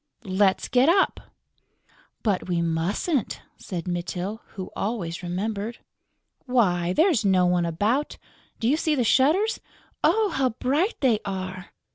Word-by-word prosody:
"Let's 190 -1 +1
get 255 +4 +4
up." 380 +3 +3 1.0
"But 200 -4 0
we 175 -1 +1
mustn't," 170 - -1 0.2
said 175 -2 -6
Mytyl, 180 +4 -3
who 190 -3 -6
always 190 -6 -3
remembered. 200 +5 -3 0.7
"Why, 180 -9 +2
there's 315 - +3
no 190 -2 +3
one 175 -1 +2
about!... 215 - 0 0.4
Do 225 - 0
you 285 +5 +3
see 315 -1 +1
the 255 - +1
shutters?" 310 - +3 0.4
"Oh, 440 -2 +3
how 270 -6 +1
bright 300 - +1
they 240 -6 +3
are!..." 185 -2 -5
205 Hz, 130 wpm, -25 LUFS, 180-265 Hz, 1.0 s, get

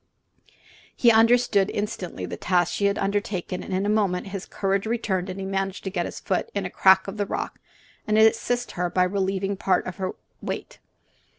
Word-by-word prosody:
He 235 - +5
understood 225 -3 +4
instantly 185 - -4
the - - -5
task 180 -1 +1
she 200 - 0
had 200 +1 0
undertaken, 195 -3 -2
and - - -8
in 190 +1 0
a - - +1
moment 200 -3 +1
his 195 -1 -6
courage 195 +1 -1
returned 200 -5 -1
and 185 +1 -5
he 190 - -4
managed 195 0 -2
to 190 - -4
get 175 -2 -1
his - - -7
foot 185 - -1
in 200 -2 -1
a 180 - -4
crack 190 0 +5
of 195 +2 -6
the 205 -1 -1
rock - - -4 0.5
and 215 0 +2
assist 230 +2 +3
her 180 -1 -2
by 180 +1 +2
relieving 195 +1 0
her - - 0
of 195 - -9
part 185 -2 +2
of 185 - -6
his 185 -1 -2 0.3
weight. - - -5
195 Hz, 205 wpm, -25 LUFS, 185-210 Hz, 0.5 s, He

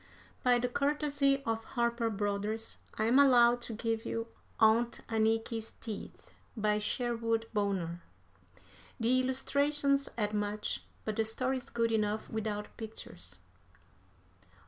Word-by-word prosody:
By 245 -1 +4
the 245 +1 0
courtesy 280 0 +1
of 225 0 -1
Harper 235 -1 0
Brothers 205 +1 -2 0.2
I - - 0
am 235 +5 +5
allowed 245 -3 +6
to 235 - -4
give 225 0 -1
you 230 0 -3 0.3
"Aunt 225 +2 +4
Anniky's 225 0 0
Teeth," 215 -3 -8 0.3
by 210 0 +2
Sherwood 230 0 0
Bonner. 190 -5 -1 1.0
The 240 +3 +3
illustrations 280 +2 +1
add 210 -2 0
much, 210 0 -2 0.2
but 215 -1 -2
the 225 - +3
story 255 +4 -1
is 255 - -9
good 230 -1 +1
enough 215 -1 0
without 210 -1 -3
pictures. 90 - -9
225 Hz, 125 wpm, -32 LUFS, 215-245 Hz, 1.0 s, allowed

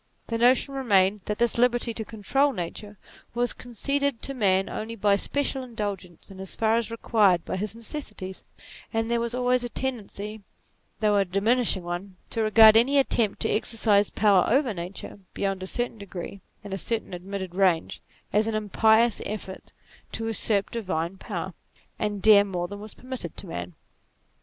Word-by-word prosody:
The 230 -1 -3
notion 255 +3 +4
remained 205 -6 +2
that 210 - -2
this 235 0 +1
liberty 240 -1 +2
to 220 - -4
control 265 +7 0
Nature 205 +2 -6 0.4
was 245 0 +1
conceded 275 +2 -2
to 275 - -1
man 195 -6 +2
only 225 +1 -5
by 205 -2 +3
special 275 +5 -1
in 245 -2 -12
dulgence, 195 -4 -5
and 190 0 -10
as 190 - -1
far 225 0 +2
as 230 -1 0
required 210 -6 +2
by - - -3
his 210 +2 -3
necessities; 210 -6 -5 0.5
and 225 0 -1
there 235 - +2
was 235 +1 -2
always 250 0 +1
a 240 - -3
tendency, 220 -4 -4 0.6
though 210 -1 +3
a 200 - +4
diminishing 200 +2 +1
one, 175 +2 -5 0.2
to 225 - -1
regard 220 0 +7
any 255 +5 +5
attempt 230 -6 +2
to - - 0
exercise 210 -2 +2
power 200 -4 +4
over 260 -1 +2
nature, 180 +3 -7 0.2
beyond 195 -1 -2
a 185 - -4
certain 240 +1 -1
degree, 195 0 -8 0.2
and 200 -2 -7
a 195 - -1
certain 225 0 -2
ad 175 - -6
mitted 190 -2 -5
range, 185 -3 +1 0.3
as 215 +1 +3
an 225 - -1
impious 220 +2 +3
effort 195 -3 -7 0.4
to 225 - -3
usurp 215 -2 +1
divine 185 -5 -3
power, 185 -3 -5 0.5
and 205 -2 -2
dare 210 -2 +8
more 180 -3 -3
than 205 +2 -8
was 215 +1 -8
permitted 255 0 -7
to - - -4
man. 90 - -6
215 Hz, 175 wpm, -26 LUFS, 195-235 Hz, 0.6 s, dare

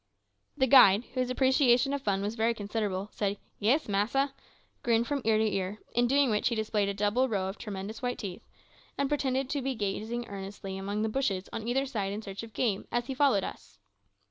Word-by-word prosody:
The 265 - +4
guide, 230 -5 +7
whose 255 -1 0
appreciation 260 0 +3
of 280 - -2
fun 200 -4 0
was 205 +2 -2
very 230 +1 +1
considerable, 205 -2 -3
said, 205 -1 -1 0.2
"Yis, 255 +10 +2
massa," 235 +8 +1 0.5
grinned 230 -1 +2
from 285 +2 -2
ear 220 -1 +3
to 220 - +2
ear, 195 -1 -1 0.2
in 240 0 +3
doing 275 -1 +3
which 210 - +1
he 235 - -1
displayed 215 -2 0
a - - -1
double 210 +6 +1
row 195 -4 -1
of 190 - -6
tremendous 205 0 -6
white 245 -1 -2
teeth, 190 -5 -7 0.5
and 280 -1 0
pretended 270 -2 0
to 285 - -1
be 265 0 -2
gazing 220 +3 -3
earnestly 195 0 -7
among 200 +2 -2
the - - +1
bushes 215 -6 -1
on 225 - -4
either 265 +3 +1
side 205 -7 -2
in 215 +2 -5
search 195 -1 -6
of 225 -1 -10
game, 205 -3 -1
as 240 0 0
he 265 - -4
followed 260 -7 +3
us. 100 -2 -8
220 Hz, 205 wpm, -29 LUFS, 200-255 Hz, 0.5 s, guide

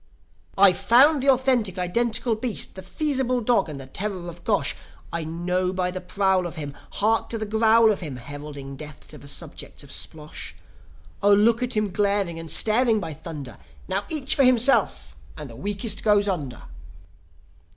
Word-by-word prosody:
"I've 190 -2 +6
found 275 +5 +5
the 275 - +2
authentic, 255 -7 +2
identical 230 +6 0
beast! 220 +1 -2
The 190 - -8
Feasible 260 +4 -1
Dog, 235 -5 +1
and 145 -2 -7
the 135 - -8
terror 185 +5 -5
of 170 0 -12
Gosh! 205 -3 +1 0.4
I 170 -1 -2
know 180 +3 -1
by 185 -1 -1
the 185 0 -6
prowl 190 -1 +1
of 170 - -9
him. 145 -3 -5 0.2
Hark 220 +2 +1
to 230 - -1
the 215 - -3
growl 220 +1 +4
of 205 - -2
him! 150 -7 -6
Heralding 140 +1 -8
death 150 +1 -10
to 150 - -10
the 145 - -13
subjects - - -6
of - - -12
Splosh. 155 -1 -5 0.7
Oh, 205 0 +5
look 225 +3 +3
at 250 -3 -1
him 210 -2 0
glaring 200 -3 0
and 165 -1 -8
staring, 220 - +4
by 165 -5 -5
thunder! 145 -7 -8 0.3
Now 200 +2 -2
each 300 -2 +2
for 280 - +3
himself, 255 +1 +2 0.2
and - - -7
the - - -12
weakest 205 +3 -1
goes 205 -1 +3
under! 150 -10 -4
200 Hz, 175 wpm, -24 LUFS, 170-230 Hz, 0.7 s, I've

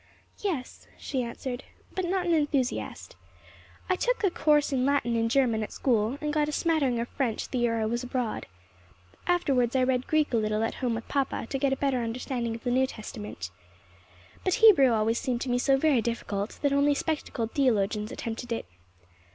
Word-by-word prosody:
"Yes," 325 -11 -4
she 265 -3 -2
answered, 245 +2 -5 0.3
"though 375 - -1
not 365 0 0
an 345 - +2
enthusiast. 290 -5 -1 0.7
I 370 - +2
took - - +1
the 395 -4 +1
course 295 -3 +2
in 255 -1 +1
Latin 265 -4 +1
and 230 0 +1
German 240 -4 +2
at 215 - -4
school, 235 0 +1
and 300 -1 -1
got 300 -1 +1
a - - -2
smattering 295 -7 +1
of 235 - -2
French 250 -6 -2
the 255 - -1
year 230 -1 +1
I 220 - 0
was 235 +3 -1
abroad. 250 -2 -3 0.8
Afterwards 270 -9 +2
I 260 - +4
read 255 -1 +1
Greek 310 -4 +1
a - - +4
little 215 0 0
at 225 - -1
home 245 -3 -1
with 225 - -6
papa, 275 -4 -1
to 270 - -1
get 275 0 +2
a - - +2
better 275 -2 +1
understanding 235 0 -3
of 230 - -10
the 245 - 0
New 260 +1 +3
Testament. 105 - -7 0.9
But 370 - +2
Hebrew 415 - +7
always 225 +1 +1
seemed 245 -3 -2
to 260 - -2
me 245 - +2
so 270 +2 +3
very 275 -4 +3
difficult 215 -3 -3
that 285 -1 +3
only 285 +1 +3
spectacled 280 -7 -2
theologians 215 -5 +1
attempted 235 +1 -5
it. 230 - -2
255 Hz, 190 wpm, -28 LUFS, 230-285 Hz, 0.9 s, Hebrew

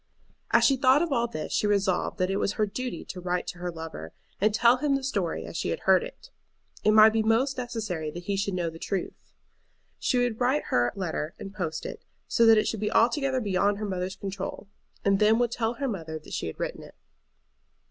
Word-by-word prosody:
As - - +4
she 270 - +4
thought 265 +4 +4
of 340 - -3
all 235 -2 +1
this 155 -9 -5
she 210 - +1
resolved 200 -2 +1
that 185 0 0
it 195 - 0
was 200 - 0
her 215 - +1
duty 250 +5 -5
to 185 - -7
write 180 0 -1
to 175 - -7
her 180 0 -3
lover, 160 - -8 0.3
and 215 +2 +3
tell 235 +3 +4
him 280 +1 +1
the 275 - -2
story 200 -11 -2
as - - -9
she - - -2
had - - -3
heard - - +4
it. - - -11 0.5
It - - +4
might 215 0 +8
be 225 - +2
most 230 +5 +2
necessary 215 -10 -3
that 175 +3 -8
he 200 +2 -1
should 200 -1 -1
know 170 -2 -1
the 165 - -11
truth. 195 +1 -5 0.7
She 255 - +1
would 245 -2 0
write 260 +4 +2
her 120 0 +2
letter 170 -4 -3
and 195 -1 -8
post 165 -6 -4
it, - - -7 0.2
so 230 - +4
that 225 -1 +8
it 215 - +2
should 225 - -2
be 210 0 -1
altogether 260 +3 +2
beyond 200 -1 +1
her 210 - -4
mother's 185 -1 -3
control, 195 +1 -6 0.4
and 195 -1 +3
then 215 +1 +5
would 240 -1 +1
tell 235 0 -1
her 275 +1 -2
mother 165 -8 -4
that 155 - -12
she - - -2
had 80 - -7
written - - -4
it. - - -13
205 Hz, 230 wpm, -27 LUFS, 180-240 Hz, 0.7 s, might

